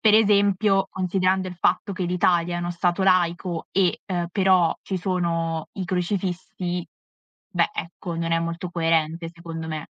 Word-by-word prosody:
Per 215 -1 +5
esempio, 200 -2 +4
considerando 185 0 +1
il 180 - -7
fatto 185 +3 +1
che 185 - -4
l'Italia 175 -1 +2
è - - -2
uno 175 0 -2
Stato 175 +2 0
laico 175 -2 +1
e, 185 -2 +2
uhm, 175 -3 -1
però 185 -4 +3
ci 190 - -3
sono 170 -3 -1
i 190 - -3
crocifissi, 180 -1 -2 0.7
beh, - - +3
ecco, 170 +1 -5
non 165 0 -1
è 165 - +3
molto 170 +2 -3
coerente 165 -1 0
secondo 165 -1 -7
me. 155 0 -4
175 Hz, 155 wpm, -24 LUFS, 170-190 Hz, 0.7 s, Per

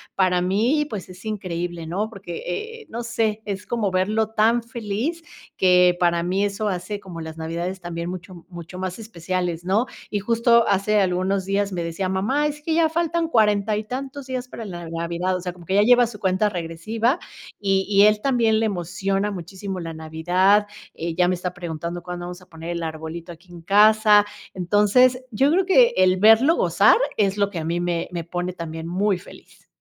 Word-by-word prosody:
para 185 -2 +2
mí 235 +11 +1
pues 200 -4 -6
es 185 +2 -13
increíble, 175 -5 -4
¿no? 200 +7 -2
Porque, 195 -5 -8
e 450 - -5
eh, - - -27
no 235 +1 -5
sé, 220 -2 -1
es 200 -1 -5
como 215 -5 -1
verlo 215 +4 +1
tan 225 +2 +2
feliz 230 -1 -9 0.7
que 180 -1 +5
para 170 -1 +2
mí 190 +4 0
eso 205 +1 -2
hace 185 +3 -4
como 180 -4 -9
las 160 0 -7
navidades 170 +3 -4
también 170 0 -5
mucho 180 -1 -9
mucho 175 0 -9
más 185 +3 -4
especiales, 180 -4 -3
¿no? 210 +7 +1 0.2
Y 205 - 0
justo 235 +2 +3
hace 205 +1 +2
algunos 190 +1 0
días 200 0 0
me 170 -1 -2
decía 170 +3 -3
mamá 225 +11 0
es 295 0 -3
que 320 +1 -1
ya 330 -1 +4
faltan 335 +1 0
cuarenta 210 -6 +2
y 215 - -3
tantos 265 +4 -6
días 255 -1 -4
para 230 - -8
la 175 -4 -7
navidad, 170 +3 -2
o - - -7
sea 180 -1 -4
como 175 -1 -15
que 190 - -3
ya 205 - +5
lleva 245 +2 +6
su 215 -3 -9
cuenta 190 +2 +1
regresiva 205 - -1 0.4
y 195 -1 +1
y 200 - +7
él 210 0 +4
también 230 -5 +2
le 225 - +1
emociona 195 +2 -2
muchísimo 190 +1 -6
la 165 -1 -6
navidad, 180 +6 +2 0.3
eh 165 0 -4
ya 180 0 +3
me 185 - +2
está 180 +1 -5
preguntando 170 0 -5
cuándo 180 -1 -6
vamos 180 +1 -8
a - - -18
poner 165 0 -9
el 170 -1 -3
arbolito 160 +2 -6
aquí 175 +2 -15
en 170 -1 -11
casa, 210 +2 +6 0.3
entonces 210 +8 +3
yo 270 +7 +2
creo 370 +3 +3
que 475 +6 +5
el 185 0 +4
verlo 225 - +6
gozar - - +4 0.2
es 200 -1 +1
lo 200 -1 +2
que 185 - -7
a 160 - -3
mí 170 +2 -1
me 175 -1 -1
me 170 -2 -4
pone 175 +2 -4
también 165 -1 -6
muy 190 +2 +1
feliz. 180 - -16
190 Hz, 200 wpm, -23 LUFS, 175-220 Hz, 0.7 s, y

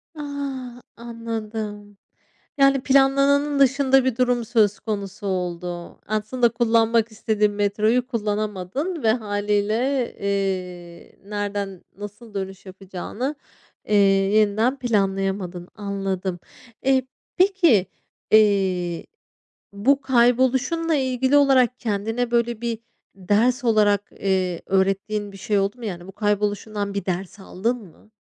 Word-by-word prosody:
Ah! 275 -4 -6 0.2
Anladım. 220 -3 -6 0.6
Yani, 275 -1 +4
planlananın 275 +1 +3
dışında 270 0 +4
bir 260 -3 +1
durum 245 -2 +1
söz 215 -3 +2
konusu 200 -1 -5
oldu. 175 -2 -4
Aslında 215 +3 +1
kullanmak 230 -1 +2
istediğin 210 -1 0
metroyu 210 +4 +1
kullanamadın 215 - -3
ve 220 - +4
hâliyle, 205 -2 -1 0.5
eee, 185 -3 -4
nereden 205 -2 -4
nasıl 205 +2 -10
dönüş 195 -1 -5
yapacağını, 195 +8 -5 0.5
eee, 210 - +1 0.4
yeniden 220 +6 +2
planlayamadın. 195 -5 -1
Anladım. 195 -3 -3 0.4
Eee, 260 -1 +2 0.3
peki, 360 - +4 0.5
eee, 190 -5 +3 0.7
bu 270 +8 +2
kayboluşunla 260 +6 +2
ilgili 260 +1 +2
olarak 255 -3 +4
kendine, 225 +3 -2
böyle, 235 -1 0
bir 235 -2 -2 0.4
ders 220 +7 +1
olarak, 210 -3 +3
eee, 185 -3 -1
öğrettiğin 195 +2 0
bir 195 - -11
şey 205 +1 0
oldu 200 +4 -1
mu? 235 - -7
Yani, 175 -3 -6
bu - - -9
kayboluşundan 205 0 -1
bir 200 - -3
ders 185 +2 -4
aldın 210 +6 -2
mı? 215 0 -17
215 Hz, 110 wpm, -23 LUFS, 195-250 Hz, 0.7 s, Yani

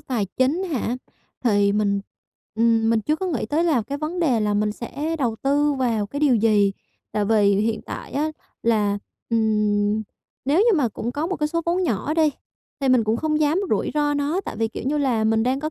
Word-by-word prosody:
tài 245 -8 -2
chính 280 +8 +2
hả? 255 -8 -2 0.5
Thì 205 -3 +3
mình, 200 -1 +1 0.5
ừm, 225 0 +3
mình 230 -1 +3
chưa 305 +8 0
có 380 - -3
nghĩ 295 -11 -2
tới 310 +8 +1
là 300 -9 +2
cái 280 +7 -5
vấn 320 +4 -3
đề 260 -9 +2
là 210 -1 +1
mình 210 0 +1
sẽ 295 +8 -4
đầu 235 -5 0
tư 290 +2 +2
vào 235 -6 0
cái 285 +7 -5
điều 290 -4 +4
gì. 210 -3 +3 0.4
Tại 210 -1 0
vì 205 -2 +3
hiện 220 +2 0
tại - - -7
á 305 +2 0 0.3
là, 210 -3 +2 0.3
ừm, 210 -1 +1 0.4
nếu 285 +5 +2
như 435 -1 +4
mà 270 -6 +2
cũng 230 +3 -5
có 300 +3 -2
một 375 - -2
cái 300 0 0
số 335 +1 -1
vốn 355 +2 +1
nhỏ 295 - -1
đi, 315 -2 +3 0.5
thì 270 - +1
mình 250 -3 +4
cũng 220 +2 +1
không 310 +2 0
dám 310 +5 +2
rủi - - +1
ro 295 -1 +1
nó, 290 +6 0
tại - - -6
vì, 225 0 0
kiểu - - -7
như 295 +2 +1
là, 245 -6 +1
mình 220 0 +2
đang 260 +3 0
có 310 - -3
245 Hz, 220 wpm, -23 LUFS, 220-300 Hz, 0.5 s, điều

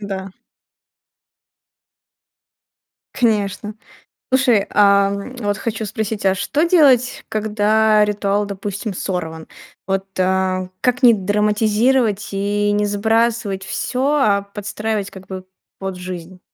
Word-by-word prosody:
Да. 195 -2 -5 2.8
Конечно. 210 -3 0 0.6
Слушай, 245 -6 +3
ам, 200 +3 +2
вот 205 -3 -1
хочу 225 0 -3
спросить, 215 0 -4
а 190 - +4
что 290 +10 0
делать, 275 -8 +4
когда 215 0 +2
ритуал, 205 0 0
допустим, 200 +1 -5
сорван? 160 -4 -4 0.4
Вот, 195 0 -1
а, 185 0 0
как 250 +1 +1
не 240 -2 +8
драматизировать 210 +2 +1
и 205 +1 0
не 205 0 +1
сбрасывать 220 -1 0
всё, 255 +6 -2
а 205 -9 +3
подстраивать, 210 0 -3
как 190 -1 -12
бы, 185 -1 -7 0.3
под 195 -1 -4
жизнь? 180 0 -8
205 Hz, 105 wpm, -19 LUFS, 195-220 Hz, 2.8 s, не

